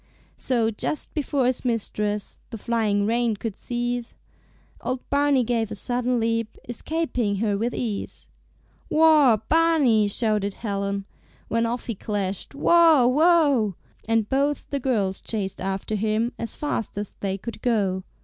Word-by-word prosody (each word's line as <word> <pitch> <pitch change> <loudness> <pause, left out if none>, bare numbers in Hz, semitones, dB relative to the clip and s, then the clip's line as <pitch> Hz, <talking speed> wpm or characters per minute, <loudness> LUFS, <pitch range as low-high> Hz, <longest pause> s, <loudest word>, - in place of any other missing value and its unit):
So, 235 -3 +1
just 260 +7 -3
before 285 -3 0
his 250 0 +1
mistress 210 -3 -2
The 225 - -6
flying 210 -2 0
rein 230 0 +1
could 210 0 -5
seize, 240 0 -3 0.7
Old 255 0 -3
Barney 280 -2 +3
gave 230 -2 0
a 215 - -5
sudden 245 +3 0
leap, 230 -1 -1
Escaping 245 -4 -1
her 205 0 0
with 230 +4 -1
ease. 220 -5 -4 0.6
"Whoa, 305 -8 +5
Barney!" 305 -10 +4
shouted 205 -1 0
Helen, 200 -2 -3 0.4
When 230 0 +1
off 240 +1 -3
he 235 - -2
clashed, 200 +2 -4
"Whoa, 325 -3 +5
whoa!" 285 - +4 0.3
And 225 -2 +2
both 280 +3 0
the 280 - 0
girls 210 -8 0
chased 200 -4 -4
after 195 +3 -3
him 215 +3 0
As 230 - -3
fast 235 -9 -3
as 205 -1 -3
they 195 -1 -2
could 230 +4 -8
go. 195 -6 +1
230 Hz, 140 wpm, -24 LUFS, 205-255 Hz, 0.7 s, Whoa